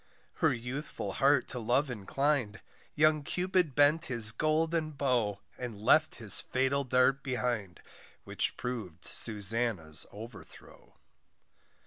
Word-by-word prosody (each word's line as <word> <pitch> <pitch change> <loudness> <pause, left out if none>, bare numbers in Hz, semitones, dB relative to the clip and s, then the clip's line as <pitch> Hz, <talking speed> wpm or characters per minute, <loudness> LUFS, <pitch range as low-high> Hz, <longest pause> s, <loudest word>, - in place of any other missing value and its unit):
Her - - +2
youthful 125 -3 -5
heart 140 +3 +2
to 125 - -3
love 125 +5 0
inclin'd, 125 +1 -2 0.4
Young 155 0 +3
Cupid 180 -1 -1
bent 145 +3 +3
his 115 -4 +4
golden 155 +4 -1
bow, 120 -8 -1 0.2
And 120 -5 -6
left 155 +9 +3
his 105 -4 -1
fatal 135 +2 -1
dart 130 +1 +2
behind, 120 -8 -4 0.4
Which - - 0
prov'd 110 -10 -6
Susannah's 105 -7 +2
overthrow. 110 +2 -13
125 Hz, 110 wpm, -30 LUFS, 110-145 Hz, 0.4 s, his